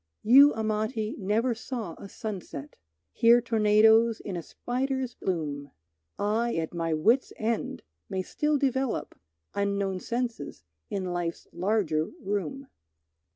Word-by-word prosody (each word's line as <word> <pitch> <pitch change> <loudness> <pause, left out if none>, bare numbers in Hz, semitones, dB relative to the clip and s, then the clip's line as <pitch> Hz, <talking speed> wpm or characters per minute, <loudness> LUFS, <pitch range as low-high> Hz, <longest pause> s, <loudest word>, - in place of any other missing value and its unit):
You, 275 +6 +8
Amati, 220 0 -1
never 220 +5 +1
saw 225 -5 -5
a 200 - -9
sunset, 180 -10 -6 0.4
Hear 235 +1 +6
tornadoes 220 0 +4
in 195 - -5
a 170 - -3
spider's 255 - -3
loom; 145 -6 -2 0.5
I, 225 +3 0
at 160 0 -2
my 165 -1 -1
wits' 230 - +3
end, 225 +1 -2 0.3
may 190 0 -2
still 300 +8 0
develop 265 -2 -1 0.4
Unknown 200 -2 -1
senses 235 - -4 0.3
in 195 -2 -2
life's 175 -1 -3
larger 180 -5 +1
room. 205 - -3
215 Hz, 115 wpm, -28 LUFS, 185-235 Hz, 0.5 s, You